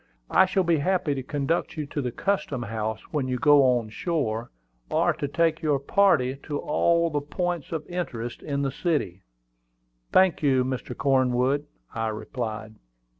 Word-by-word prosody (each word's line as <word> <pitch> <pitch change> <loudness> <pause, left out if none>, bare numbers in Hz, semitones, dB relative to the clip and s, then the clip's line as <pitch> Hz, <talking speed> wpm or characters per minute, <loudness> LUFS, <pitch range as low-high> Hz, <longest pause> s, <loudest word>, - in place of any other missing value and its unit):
"I 190 - +5
shall 190 0 +1
be 170 -2 +2
happy 180 -1 +1
to 135 - -3
conduct 150 +5 -2
you 150 - -2
to 145 +1 -4
the 125 -2 -2
custom 145 -6 -1
house 110 -1 -3
when 145 -4 -1
you 125 -1 -1
go 145 +3 +6 0.2
on 115 -2 -5
shore, 115 -3 -2 0.4
or - - +2
to 145 - -3
take 165 +2 +1
your 150 -3 +2
party 140 -4 +2
to 145 -2 -4
all 170 +3 +2
the 145 -1 0
points 175 +2 -3
of 160 -2 -3
interest 130 -10 -5
in 140 -2 -2
the 135 - 0
city." 135 - -1 0.9
"Thank 185 -2 +4
you, 130 -4 +3
Mr. 130 -1 -4
Cornwood," 130 +1 +2 0.3
I 115 -1 -1
replied. 110 -1 -5
140 Hz, 165 wpm, -26 LUFS, 125-165 Hz, 0.9 s, go